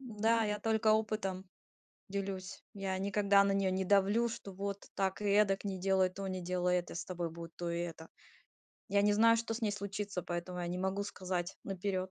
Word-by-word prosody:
М-да, 225 -2 +1
я 210 0 -1
только 220 -1 +3
опытом, 210 -4 0 0.7
делюсь. 195 -1 -4
Я 195 -2 -2
никогда 200 +1 +4
на 195 - +2
неё 195 -1 +2
не 190 0 0
давлю, 205 +4 +4
что 200 -3 -7
вот, 200 +1 -4
так 190 +1 0
и - - -2
эдак, 200 -1 +3
не 195 -2 -3
делай 190 0 +3
то, 195 +2 -6
не 185 -1 -3
делай 180 0 +1
это, 175 - -8
с 175 - -4
тобой 175 -2 -3
будет 165 0 -9
то 175 -1 -3
и 170 - -1
это. 165 -2 -5 0.8
Я 200 0 +3
не 205 0 +4
знаю, 230 +2 +6
что 230 0 -2
с 235 - -5
ней 215 -2 +1
случится, 200 -2 -4
поэтому 175 +1 -4
я 175 - -2
не 180 +1 -3
могу 190 +2 0
сказать 185 -3 -3
наперёд. 190 -1 -2
195 Hz, 205 wpm, -34 LUFS, 185-205 Hz, 0.8 s, знаю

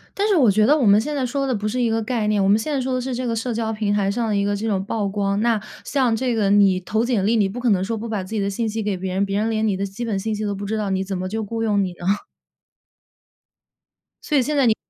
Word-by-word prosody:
但 405 - +1
是 405 - +3
我 255 -9 +5
觉 215 +2 +3
得 295 +5 +5
我 285 - +1
们 205 +1 +6
现 295 +6 -3
在 275 -3 -1
说 275 +2 -1
的 260 - 0
不 210 -1 -2
是 250 +4 -2
一 240 - +2
个 225 0 0
概 225 -1 -1
念， 210 -1 +2
我 195 - +2
们 205 +2 +5
现 260 +8 -3
在 280 - 0
说 260 0 -1
的 255 - 0
是 255 0 -3
这 250 +1 -3
个 230 - -1
社 230 +1 -2
交 220 -1 -1
平 215 -2 -1
台 200 -1 +1
上 230 +2 -1
的 210 - 0
一 200 - +1
个 205 0 0
这 215 +3 -4
种 195 -4 0
曝 205 0 -2
光。 200 0 -1
那 230 -1 +2 0.2
像 255 -5 +1
这 245 +1 0
个 210 -3 +1
你 200 -2 +4
投 215 +5 -1
简 235 -6 0
历， 230 +2 +3
你 205 -3 +3
不 225 +6 -6
可 245 -1 +2
能 190 -3 +2
说 225 +3 -2
不 225 +2 -5
把 215 -3 -2
自 185 - -7
己 215 - 0
的 200 - 0
信 225 +3 -2
息 220 +1 -3
给 205 -2 -1
别 185 0 -4
人， 195 +1 +1
别 200 0 -1
人 220 +2 0
连 220 0 0
你 200 -3 +1
的 195 - -2
基 195 +5 -6
本 215 -4 -1
信 215 +3 -2
息 215 +1 -3
都 205 -1 -1
不 200 +1 -6
知 215 +2 -2
道， 210 -2 -2
你 190 0 0
怎 195 0 -4
么 185 +1 -3
就 220 +3 -3
雇 225 +2 -4
佣 205 -3 +2
你 185 - -3
呢？ 175 0 -9 2.2
所 300 - 0
以 270 - +4
现 295 +4 -1
在 275 -3 +4
你 220 -2 +3
215 Hz, 350 characters per minute, -22 LUFS, 200-235 Hz, 2.2 s, 们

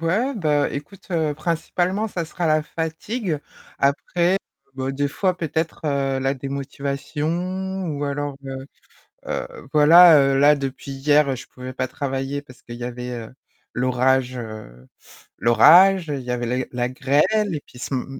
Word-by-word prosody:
ouais, 215 +12 0
bah, 150 -8 +1
écoute, 165 +8 -9
heu, 160 -4 0
principalement 175 +6 -1
ça 175 -4 -3
sera 170 +2 -3
la 155 0 +3
fatigue. 165 +4 -3 0.4
Après, 170 +6 +1 0.4
bah, 130 0 -3
des 140 +1 -1
fois 185 +5 0
peut-être, 160 -1 -3
heu, 140 -2 0
la 135 +1 0
démotivation 150 +8 -3
ou 145 -2 -3
alors, 145 0 -3
heu, 135 0 -6 0.6
heu, - - -3 0.3
voilà, 160 +2 +8
heu, 135 -1 +3
là 145 +1 +6
depuis 135 0 -5
hier, 140 0 +2
je 130 - -10
pouvais 130 0 -9
pas 130 0 -2
travailler 135 +1 -3
parce 130 -3 -17
qu'il 120 0 -9
y 120 - -7
avait, 125 0 -6
heu, 115 -1 -7 0.4
l'orage, 130 0 +1
heu, 110 - -9 0.5
l'orage. 170 - +6
Il 140 -3 -3
y 125 - -6
avait 120 -1 -2
la 125 +2 -1
la 125 -1 -1
grêle 150 +10 +1
et 145 - -4
puis 125 - -16
ce 130 - -4
m 125 - -2
145 Hz, 160 wpm, -22 LUFS, 130-165 Hz, 0.6 s, voilà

